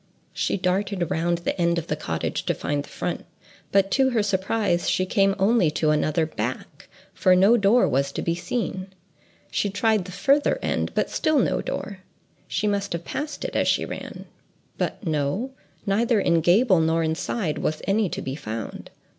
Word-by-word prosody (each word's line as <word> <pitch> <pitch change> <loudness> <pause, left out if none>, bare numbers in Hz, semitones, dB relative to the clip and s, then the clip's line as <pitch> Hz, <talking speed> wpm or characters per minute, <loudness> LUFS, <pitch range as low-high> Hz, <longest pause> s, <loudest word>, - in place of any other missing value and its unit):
She - - -1
darted 185 -1 -1
round 170 +1 +1
the 170 - -2
end 170 0 +2
of 170 - -2
the 150 - -2
cottage 80 - -3
to - - +1
find 145 -1 -2
the - - -14
front. - - -4 0.5
But, 195 0 +3
to 265 -1 +3
her 230 -4 +1
surprise, 195 -2 0
she 185 - +1
came 195 +1 +2
only 200 -3 +3
to 155 0 +1
another 155 +1 +1
back, 130 +2 -5 0.2
for 185 -1 +4
no 195 +6 +6
door 225 +2 +4
was 140 +2 0
to - - -3
be 170 - 0
seen. 190 0 -3 0.6
She 205 - 0
tried 210 -1 +1
the 185 - -8
farther 280 +9 +2
end, - - -1
but - - 0
still 310 -1 +1
no 260 - +2
door. 200 -2 -5 0.5
She 210 - -2
must 200 -2 0
have 170 0 -4
passed 300 - -4
it - - -5
as - - +2
she - - +2
ran—but 220 - -7
no—neither 205 - -1
in 170 -4 +2
gable 185 +3 +4
nor 160 +1 +2
in 160 0 0
side 165 -1 -2
was 155 - -2
any 200 0 +1
to - - -5
be 135 - -4
found. 110 -5 -6
185 Hz, 180 wpm, -24 LUFS, 160-210 Hz, 0.6 s, no